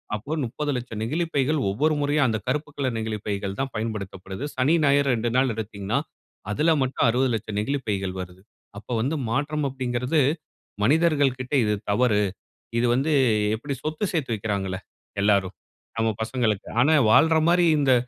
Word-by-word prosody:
அப்போ 120 +9 -5
30,00,000 125 -3 -3
நெகிழிப் 160 +8 -2
பைகள் 140 +2 +2
ஒவ்வொரு 150 +11 +1
முறையா 145 +1 +1
அந்த 110 -2 0
கருப்புக்கலர் 140 -3 -2
நெகிழிப்பைகள் 105 -3 -3
தான் 135 -1 -2
பயன்படுத்தப்படுது. 100 -1 -5
சனி, 135 +5 +2
ஞாயிறு 140 0 +4
2 115 +1 -1
நாள் 130 -1 +3
எடுத்தீங்கன்னா, 100 -3 -2 0.5
அதுல 155 +8 +3
மட்டும் 130 - 0
60,00,000 115 -4 0
நெகிழிப் 135 +5 -2
பைகள் 95 -2 -1
வருது. 90 0 -10 0.4
அப்ப 105 - -21
வந்து 140 +7 0
மாற்றம் 145 +5 -1
அப்டிங்குறது 125 +3 -1 0.7
மனிதர்கள்க்கிட்ட 145 -3 +2
இது 105 - +1 0.2
தவறு. 105 0 +3 0.6
இது 120 - +2
வந்து 145 +5 +1 0.4
எப்படி 140 +5 -5
சொத்து 155 +4 -3
சேர்த்து 140 -9 -1
வைக்கிறாங்கள்ள 100 -3 -2 0.5
எல்லாரும் 100 -2 +2 0.4
நம்ம 115 0 +2
பசங்களுக்கு. 110 -4 -1
ஆனா 150 +5 +4 0.2
வாழ்ற 160 +6 +5
மாரி 175 0 +4
இந்த 135 -2 +4
125 Hz, 140 wpm, -24 LUFS, 105-145 Hz, 0.7 s, வாழ்ற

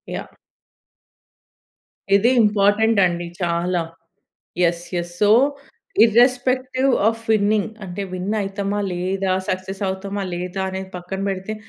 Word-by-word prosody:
Yeah! - - -7 1.8
ఇది 210 +4 +4
important 210 +1 +3
అండి 175 0 -4
చాలా. 175 +1 0 0.8
Yes, 170 0 +1
yes. 175 0 -3
So 205 -1 +4 0.7
irrespective 255 +3 +2 0.2
of 225 0 -2
winning 210 0 +2 0.2
అంటే, 185 +1 -5
విన్ 185 +3 -3
అయతమా? 200 +1 -2
లేదా? 185 +2 -1 0.2
సక్సెస్ 185 +1 -3
అవుతామా? 195 +1 -4
లేదా? 180 +2 -4
అనేది 190 0 -6
పక్కన 180 +2 -6
పెడితే, 195 +2 -3
195 Hz, 110 wpm, -21 LUFS, 180-215 Hz, 1.8 s, ఇది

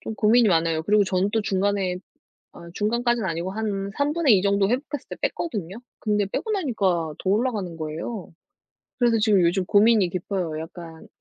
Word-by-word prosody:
좀 220 - -6
고민이 220 +1 +4
많아요. 165 -2 +1
그리고 205 +4 +3
저는 185 +1 0
또 225 - +2
중간에 195 -2 0 0.6
아 170 - -12
중간까지는 235 0 0
아니고 170 +2 -3
한 200 -2 -3
3 285 +1 +1
분의 300 -10 +4
2 185 - 0
정도 200 0 +2
회복했을 270 +4 -3
때 - - -5
뺐거든요? 200 - -5 0.2
근데 210 -2 0
빼고 440 - -4
나니까 195 - 0
더 190 - 0
올라가는 205 -5 -1
거예요. 165 +7 -6 0.7
그래서 235 -2 +3
지금 210 -3 +3
요즘 175 +2 +2
고민이 210 0 +4
깊어요. 180 -3 -3
약간 165 0 -10
200 Hz, 370 characters per minute, -24 LUFS, 180-225 Hz, 0.7 s, 고민이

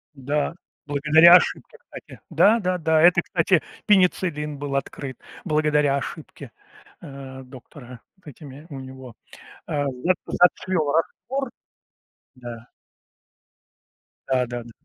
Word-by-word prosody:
Да, 145 +3 -2 0.3
благодаря 155 +4 +6
ошибке, - - 0
кстати. - - -13
Да 225 +3 +4
да 185 -3 -1
да. 160 -2 +2
Это, 175 +1 +5
кстати, 175 -1 +1 0.2
пенициллин 175 -6 +1
был 140 -1 -4
открыт 135 -1 -5 0.3
благодаря 150 -3 +1
ошибке, 140 - -8 0.5
а, 135 -1 -10
доктора 125 -1 -13 0.2
с - - -20
этими, 145 +1 -12
у 140 -3 -8
него, 130 -2 -11 0.5
а, 145 -1 -2
зэп 165 +8 -1
зацвёл 180 -3 +1
раствор. 255 - -2 0.9
Да. 120 -2 -10 1.6
Да, 130 -1 +1
да-да. 120 -1 -7
145 Hz, 110 wpm, -23 LUFS, 130-170 Hz, 1.6 s, благодаря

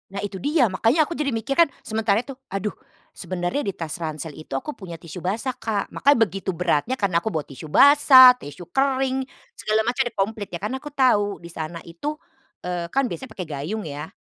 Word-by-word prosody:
Nah 195 +1 -5
itu 195 -2 -6
dia, 290 -2 +3
makanya 230 - +3
aku 340 - -5
jadi 300 -3 -1
mikir 230 +2 -2
kan, 335 - +6 0.2
sementara 220 0 +1
itu, 275 - -7 0.2
aduh 195 +1 -3 0.4
sebenarnya 175 +6 -3
di 195 - -2
tas 165 0 -5
ransel 155 -1 -4
itu 155 -3 -7
aku 300 - -5
punya 185 -8 -9
tisu 165 +1 -9
basah, 220 +9 -1
Kak. 220 -4 -3
Makanya 285 -1 +4
begitu 195 -2 -4
beratnya 180 - 0
karena 195 -7 +1
aku - - -7
bawa 160 -7 -2
tisu 140 +3 -10
basah, 270 - +9
tisu 160 +5 -10
kering 265 0 +1 0.3
segala 215 +1 0
macam 250 +2 +1
komplit 205 +1 -2
ya - - -5
karena 255 +6 -2
aku - - -9
tahu 205 -7 +3
di 170 - -9
sana 160 0 -6
itu, 175 - -5 0.5
eee, 175 -1 -3
kan 275 +9 +1
biasanya 260 - -6
pakai 180 -3 -5
gayung 155 +9 -4
ya 145 +1 -6
205 Hz, 200 wpm, -23 LUFS, 170-260 Hz, 0.5 s, basah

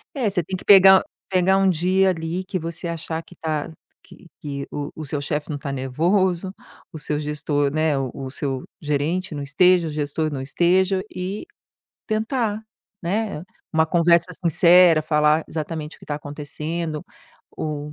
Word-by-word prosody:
É, 250 -6 +1
você 185 -4 0
tem 185 +4 -4
que - - -13
pegar 190 -1 +8
o - - -9 0.3
pegar 190 0 +3
um 195 -1 +3
dia 185 +3 +2
ali 165 +1 -2
que 190 -1 -3
você 165 0 -5
achar 165 -1 -4
que 180 - -17
tá 155 -1 -3 0.3
que - - -17
que 140 -2 -5
o 145 -1 -4
o 155 - -6
seu 145 +1 -3
chefe 150 +1 -3
não 145 - -3
tá 140 0 -5
nervoso, 175 +8 0 0.4
o - - -6
seu 150 0 -2
gestor, 145 -1 -1
né, 155 -2 +1
o 135 -2 -2
o 135 -1 -6
seu 135 -2 -3 0.2
gerente 150 +4 -1
não 145 - -4
esteja 175 +4 +3
o - - -4
gestor 150 +1 -2
não 135 - -4
esteja 185 +6 +2
e 190 - -4 0.6
tentar, 220 -1 -1 0.4
né, 200 -1 -2 0.3
uma 160 0 +3
conversa 170 0 +4
sincera, 170 0 +5
falar 150 0 +2
exatamente 155 -1 -5
o - - -25
que - - -15
tá 150 - -2
acontecendo, 150 +2 -5 0.5
o 150 -1 -4
160 Hz, 170 wpm, -22 LUFS, 150-185 Hz, 0.6 s, pegar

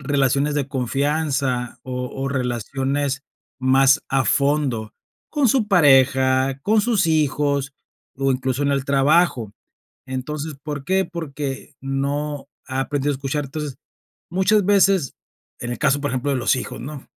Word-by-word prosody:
relaciones 140 +1 +1
de 140 - 0
confianza 135 -1 -1
o 125 -1 -4
o 135 +1 -3
relaciones 135 +2 -2 0.4
más 135 +2 +4
a 135 -1 +1
fondo 140 -7 +1 0.4
con 295 -3 +2
su 230 -2 +2
pareja, 135 -5 +4
con 215 +1 +3
sus 220 -5 +1
hijos, 145 -3 +1 0.4
o 135 0 +1
incluso 130 +1 -1
en 140 - +2
el 135 -1 0
trabajo. 140 - +2 0.5
Entonces, 140 +3 -5
¿por 145 -2 -5
qué? 190 +3 +2
Porque 145 -4 -5
no 140 +1 -2 0.2
ha 130 0 -1
aprendido 145 +1 -1
a - - -2
escuchar. 140 +2 -3
Entonces, 145 0 -6 0.5
muchas 190 +3 +3
veces 195 -6 +3 0.5
en 120 - -4
el - - -5
caso, 145 +1 +2
por 145 0 -2
ejemplo, 130 +2 -1
de 140 - +1
los 125 - +2
hijos, - - -5
¿no?, 145 -1 -8
140 Hz, 145 wpm, -22 LUFS, 130-150 Hz, 0.5 s, más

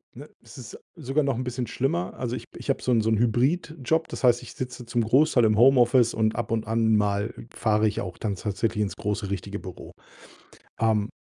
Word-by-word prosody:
Ne? - - -11
Es - - -14
ist - - -9 0.2
sogar 150 -2 -1
noch 135 -2 0
'n 125 - -3
bisschen 125 0 -3
schlimmer. 100 -7 -2
Also, 125 -1 -3
ich - - -7
ich - - -9
habe 135 - 0
so 130 - 0
'n 115 -2 +4
so 110 - 0
'n 110 - +2
Hybridjob, 145 +6 0
das - - -7
heißt, 120 -1 +4
ich 125 - -10
sitze 125 -1 -6
zum 120 +1 -1
Großteil 130 +3 +3
im 110 -1 +2
Homeoffice 125 -1 +5
und 110 -1 0
ab 120 -2 -3
und 110 -1 -1
an 110 0 +2
mal 105 0 0 0.2
fahre 110 -1 +1
ich 105 - -2
auch 90 -2 -6
dann 105 -3 -3
tatsächlich 105 +3 -2
ins 100 - -4
große 105 -1 -3
richtige 100 +1 -4
Büro. 90 -3 -10 0.9
Ähm, 110 -2 +1
115 Hz, 215 wpm, -25 LUFS, 105-125 Hz, 0.9 s, Homeoffice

